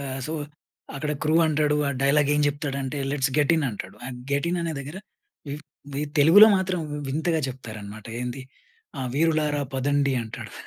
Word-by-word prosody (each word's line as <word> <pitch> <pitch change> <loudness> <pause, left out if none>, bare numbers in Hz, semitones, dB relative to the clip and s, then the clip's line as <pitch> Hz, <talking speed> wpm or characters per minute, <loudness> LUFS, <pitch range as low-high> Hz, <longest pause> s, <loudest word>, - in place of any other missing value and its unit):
ఆహ్, 135 -1 -4
సో 155 - -4 0.6
అక్కడ 150 +2 -2
క్రూ 155 +1 +2
అంటాడు. 150 -1 +2
ఆ - - +1
డైలాగ్ 140 +1 +3
ఏం 150 - +2
జెప్తాడంటే 145 -1 -2
"లెట్స్ 135 -1 +1
గెట్ 145 +1 +4
ఇన్" 160 - +1
అంటాడు. 100 -2 -8 0.3
గెట్ 140 +3 +1
ఇన్ 175 - 0
అనే 165 -1 -2
దగ్గర 140 +5 -7 0.5
వి 140 - -3 0.4
వి 140 - -1 0.2
తెలుగులో 165 +9 +9
మాత్రం 185 -2 -1 0.3
వింతగా 160 +4 0
చెప్తారనమాట. 110 -4 -8
ఏంది 125 +2 -4 0.6
ఆ - - -2
వీరులారా 150 -1 +2
పదండి 140 +1 +1
అంటాడు. 110 - -8
145 Hz, 155 wpm, -25 LUFS, 135-155 Hz, 0.6 s, తెలుగులో